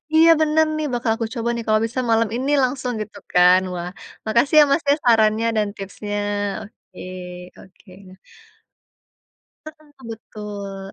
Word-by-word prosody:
Iya, 325 +1 +7
bener 315 +1 +3
nih, 310 - -2
bakal 240 -2 0
aku 230 - -3
coba, 235 0 -2
nih. 235 - -4
Kalau 215 0 +3
bisa 240 +3 -4
malam 225 -1 +2
ini 265 +4 -1
langsung, 255 0 -1
gitu 215 - -8 0.2
kan. 180 +1 +6
Wah, 175 0 -5 0.4
makasih 235 +7 +2
ya, - - +9
Mas, 320 - +2
ya, 285 - +5
sarannya 225 -1 +3
dan 210 -1 +1
tipsnya. 205 +1 -6 0.5
Oke, 210 - -17 0.6
oke, 190 +1 -19 0.2
nah. 185 - -15 1.5
Heeh, 310 0 -13 0.2
betul, 205 -3 -8
225 Hz, 150 wpm, -21 LUFS, 205-260 Hz, 1.5 s, ya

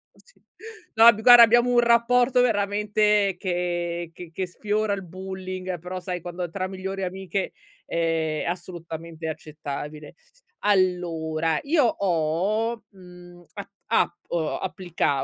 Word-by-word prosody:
sì. - - -25 0.5
No, 230 +1 +8
b 220 - -7
guarda, 245 0 +9
abbiamo 240 +2 +4
un 240 - +4
rapporto 240 +2 +4
veramente 210 -2 +2
che 175 -2 -2
che 175 -1 -10
che 185 +3 -3
sfiora 210 +3 -1
il 195 -1 -4
bullying 185 0 -6
però, 180 +2 -6
sai, 180 -1 -5
quando 175 0 -5
tra 185 -1 -3
migliori 190 +1 -5
amiche 190 +1 -3 0.3
è 165 -2 -1
assolutamente 170 -2 -6
accettabile. 150 -1 -7 0.5
Allora, 165 -5 +1
io 290 -2 +3
ho, 200 +5 0
mhmm, 180 -2 -15
a 200 0 -7 0.2
app 175 - 0
uhm, 160 -3 -1
applica 180 -7 -1
185 Hz, 120 wpm, -24 LUFS, 170-210 Hz, 0.5 s, guarda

